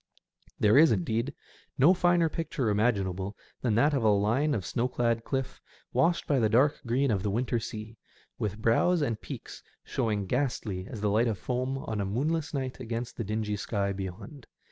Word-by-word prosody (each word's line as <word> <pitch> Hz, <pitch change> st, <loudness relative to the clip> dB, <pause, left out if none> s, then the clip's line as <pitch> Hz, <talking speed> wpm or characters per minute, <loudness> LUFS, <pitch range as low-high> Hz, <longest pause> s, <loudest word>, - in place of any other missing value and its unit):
There 105 Hz, +6 st, +5 dB
is, 160 Hz, 0 st, +7 dB
indeed, 110 Hz, +6 st, 0 dB, 0.5 s
no 145 Hz, +7 st, +6 dB
finer 175 Hz, -2 st, +3 dB
picture 155 Hz, -7 st, -2 dB
imaginable 100 Hz, -3 st, 0 dB, 0.2 s
than 115 Hz, -4 st, +1 dB
that 145 Hz, +6 st, +4 dB
of 135 Hz, -, +1 dB
a 110 Hz, -, +4 dB
line 115 Hz, +9 st, +2 dB
of 95 Hz, -, -3 dB
snow 120 Hz, +1 st, 0 dB
clad 115 Hz, -2 st, 0 dB
cliff, 135 Hz, 0 st, -3 dB, 0.3 s
washed 170 Hz, 0 st, +2 dB
by 140 Hz, -3 st, +2 dB
the 110 Hz, -2 st, +3 dB
dark 130 Hz, +7 st, +3 dB
green 130 Hz, +3 st, +2 dB
of 100 Hz, -3 st, 0 dB
the 105 Hz, -, -1 dB
winter 120 Hz, +3 st, 0 dB
sea, 110 Hz, 0 st, -7 dB, 0.4 s
with 105 Hz, -1 st, -2 dB
brows 145 Hz, +10 st, +3 dB
and 115 Hz, -6 st, -2 dB
peaks -, -, -8 dB, 0.2 s
showing 105 Hz, -3 st, -1 dB
ghastly 110 Hz, -6 st, -2 dB
as 110 Hz, -, -7 dB
the 105 Hz, -1 st, +1 dB
light 115 Hz, +4 st, +3 dB
of 110 Hz, -3 st, -1 dB
foam 130 Hz, +4 st, -2 dB
on 110 Hz, -5 st, -3 dB
a -, -, -1 dB
moonless 150 Hz, +10 st, -1 dB
night 130 Hz, -3 st, -3 dB
against 115 Hz, 0 st, -4 dB
the 115 Hz, -, -3 dB
dingy 105 Hz, 0 st, -2 dB
sky 100 Hz, -1 st, -1 dB
beyond. 95 Hz, +9 st, -7 dB
115 Hz, 185 wpm, -29 LUFS, 105-135 Hz, 0.5 s, is